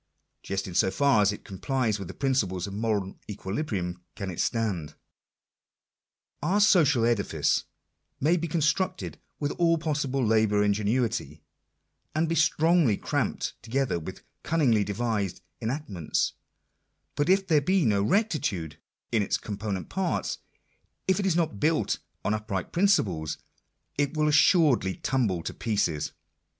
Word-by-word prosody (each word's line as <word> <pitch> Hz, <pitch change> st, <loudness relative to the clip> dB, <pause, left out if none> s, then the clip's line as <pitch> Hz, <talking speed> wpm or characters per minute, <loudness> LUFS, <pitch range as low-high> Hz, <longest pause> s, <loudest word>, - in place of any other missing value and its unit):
Just 95 Hz, 0 st, -3 dB
in 90 Hz, -, -7 dB
so 95 Hz, -, +3 dB
far 135 Hz, +2 st, +3 dB
as 100 Hz, 0 st, +4 dB
it 105 Hz, -, -8 dB
complies 110 Hz, +2 st, -1 dB
with 100 Hz, -, -6 dB
the 95 Hz, -, -9 dB
principles 105 Hz, -10 st, 0 dB
of 100 Hz, -, -7 dB
moral 105 Hz, -3 st, -2 dB
equilibrium 95 Hz, -, -3 dB
can 100 Hz, -2 st, -4 dB
it 85 Hz, -, -8 dB
stand. 95 Hz, -10 st, -1 dB, 1.5 s
Our 185 Hz, +7 st, +2 dB
social 150 Hz, -, +5 dB
edifice 115 Hz, -4 st, +1 dB, 0.5 s
may 160 Hz, +6 st, +3 dB
be 170 Hz, -1 st, -1 dB
constructed 170 Hz, +4 st, -1 dB, 0.2 s
with 145 Hz, -1 st, -1 dB
all 165 Hz, -1 st, +4 dB
possible 145 Hz, -5 st, -1 dB
labour 110 Hz, -2 st, +3 dB
and 105 Hz, 0 st, +3 dB
ingenuity, 110 Hz, -, -1 dB, 0.7 s
and 160 Hz, +1 st, +2 dB
be 165 Hz, -, 0 dB
strongly 160 Hz, -, +3 dB
cramped -, -, -2 dB
together 125 Hz, -4 st, -1 dB
with 80 Hz, -, -8 dB, 0.2 s
cunningly 130 Hz, -10 st, +2 dB
devised 105 Hz, -2 st, -2 dB, 0.2 s
enactments, 110 Hz, -, -2 dB, 0.8 s
but 145 Hz, +3 st, 0 dB
if 195 Hz, +1 st, +4 dB
there 155 Hz, -5 st, +3 dB
be 185 Hz, +2 st, +2 dB
no 100 Hz, -3 st, +3 dB
rectitude 110 Hz, -, 0 dB, 0.3 s
in 115 Hz, -3 st, +2 dB
its 100 Hz, -, 0 dB
com 105 Hz, -2 st, -6 dB
ponent 100 Hz, -3 st, -3 dB
parts 190 Hz, -2 st, -1 dB, 0.3 s
— -, -, -45 dB
if 190 Hz, +1 st, +3 dB
it 195 Hz, -, 0 dB
is 180 Hz, -, +2 dB
not 160 Hz, -12 st, 0 dB
built 160 Hz, +5 st, +1 dB, 0.3 s
on 105 Hz, -, +2 dB
upright 105 Hz, -4 st, -3 dB
principles, 95 Hz, -, +2 dB, 0.6 s
it 145 Hz, +2 st, 0 dB
will 155 Hz, 0 st, +3 dB
assuredly 145 Hz, -, +4 dB
tumble 110 Hz, -10 st, 0 dB
to -, -, -4 dB
pieces. 100 Hz, -9 st, -1 dB
115 Hz, 140 wpm, -27 LUFS, 100-155 Hz, 1.5 s, social